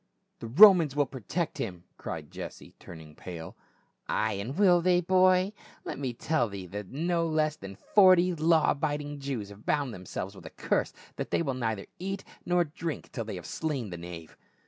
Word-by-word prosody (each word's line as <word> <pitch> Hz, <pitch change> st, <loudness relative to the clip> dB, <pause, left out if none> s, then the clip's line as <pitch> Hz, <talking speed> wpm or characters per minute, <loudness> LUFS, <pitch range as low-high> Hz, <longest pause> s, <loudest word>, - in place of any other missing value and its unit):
"The 115 Hz, -, -6 dB
Romans 165 Hz, -, +7 dB
will 145 Hz, -1 st, +3 dB
protect 140 Hz, -, -4 dB
him 90 Hz, -6 st, -4 dB
!" -, -, -44 dB
cried -, -, -6 dB
Jesse, -, -, -9 dB
turn 85 Hz, -, -11 dB
ing 75 Hz, -1 st, -14 dB
pale. 85 Hz, 0 st, -8 dB, 0.3 s
" -, -, -47 dB
Ay, 110 Hz, 0 st, +1 dB
and 105 Hz, +8 st, -5 dB
will 180 Hz, -4 st, +5 dB
they, 180 Hz, 0 st, +4 dB
boy? 185 Hz, +2 st, +3 dB, 0.3 s
Let -, -, -5 dB
me 135 Hz, -3 st, -2 dB
tell 120 Hz, 0 st, 0 dB
thee 100 Hz, -2 st, -7 dB
that 100 Hz, +1 st, -7 dB
no 165 Hz, +3 st, 0 dB
less 155 Hz, -1 st, +1 dB
than 100 Hz, -8 st, -9 dB
forty 185 Hz, -, +5 dB
law 160 Hz, 0 st, +3 dB
abiding 145 Hz, 0 st, -2 dB
Jews 130 Hz, -7 st, -4 dB
have 100 Hz, +1 st, -13 dB
bound 145 Hz, -5 st, 0 dB
them 90 Hz, -2 st, -10 dB
selves 95 Hz, -, -5 dB
with 95 Hz, -, -11 dB
a -, -, -8 dB
curse -, -, -1 dB, 0.3 s
that -, -, -4 dB
they -, -, +1 dB
will 135 Hz, -4 st, -1 dB
neither 115 Hz, -5 st, -2 dB
eat 195 Hz, +2 st, -4 dB, 0.2 s
nor 175 Hz, 0 st, +3 dB
drink 160 Hz, 0 st, -6 dB
till 115 Hz, -4 st, -4 dB
they 105 Hz, -2 st, -5 dB
have 90 Hz, -3 st, -8 dB
slain 135 Hz, -, -3 dB
the 85 Hz, -, -5 dB
knave." 85 Hz, -1 st, -9 dB
140 Hz, 200 wpm, -29 LUFS, 100-170 Hz, 0.3 s, Romans